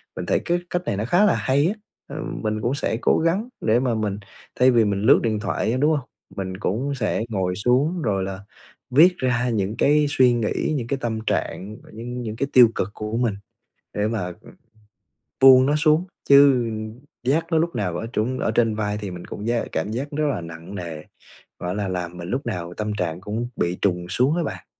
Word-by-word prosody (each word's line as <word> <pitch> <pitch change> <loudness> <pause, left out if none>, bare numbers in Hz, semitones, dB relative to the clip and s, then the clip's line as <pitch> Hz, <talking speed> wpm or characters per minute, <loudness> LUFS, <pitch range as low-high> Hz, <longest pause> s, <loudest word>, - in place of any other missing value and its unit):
mình - - -5
thấy - - +1
cái 175 +1 +1
cách 180 - -1
này 100 - -1
nó 110 - -2
khá 180 +10 +4
là 210 - +3
hay 140 +4 +2
á, 200 - 0 0.3
ờ, 140 - -8 0.3
mình 110 0 -1
cũng 125 +4 0
sẽ 115 -5 -1
cố - - +3
gắng 200 +9 0
để 110 +2 +3
mà 125 -3 0
mình 105 -2 -2 0.4
thay 130 +1 +6
vì 115 -3 +4
mình 100 -1 -1
lướt - - +6
điện 110 -2 0
thoại 110 0 -1
á, 125 - 0
đúng 150 +4 +3
hông? 140 -4 -2 0.3
Mình 95 -1 -4
cũng 125 +9 -2
sẽ 110 -2 -1
ngồi 95 -3 -1
xuống 135 - +1
rồi 100 -7 0
là 95 0 -5 0.5
viết 170 +8 +5
ra 125 -1 0
những 105 -2 -1
cái 150 +3 +4
suy 130 -3 +4
nghĩ, 120 +6 -1
những 120 -3 -4
cái 135 - -1
tâm 110 -2 -2
trạng, 105 +4 -2 0.2
những 120 +3 -6
những 110 -2 -5
cái 140 +4 -1
tiêu 125 -3 +8
cực 95 - -1
của 105 +2 -4
mình 115 -5 0 0.6
để 105 +1 0
mà 100 -6 -3 1.1
buông 130 -1 +8
nó 145 +2 +2
xuống, 155 +3 +3 0.2
chứ 140 -4 +6 0.6
vác 165 +5 +1
nó 165 - +3
lúc 170 +2 0
nào 90 -4 -1
ở 115 - -4
trên 125 +4 -1
ở - - 0
trên 115 -1 +2
vai 105 -1 -2
thì 100 -3 -5
mình 90 -1 -8
cũng 105 +3 -7
giác 120 0 0
cảm 100 +7 -2
giác 130 +5 -3
rất 150 +1 -1
là 120 -11 -1
nặng 80 +3 -9
nề, 85 -4 -6 0.6
gọi 90 +1 -3
là, 100 -1 -2
làm 90 -1 -4
mình 85 +1 -7
lúc 135 +3 -2
nào 90 -1 -4
tâm 105 +1 -3
trạng 90 -3 -3
cũng 110 +4 -3
bị 85 +1 -1
trùng 90 -3 0
xuống 135 - +2
á 170 - 0
bạn. 90 - -6
115 Hz, 220 wpm, -23 LUFS, 100-135 Hz, 1.1 s, tiêu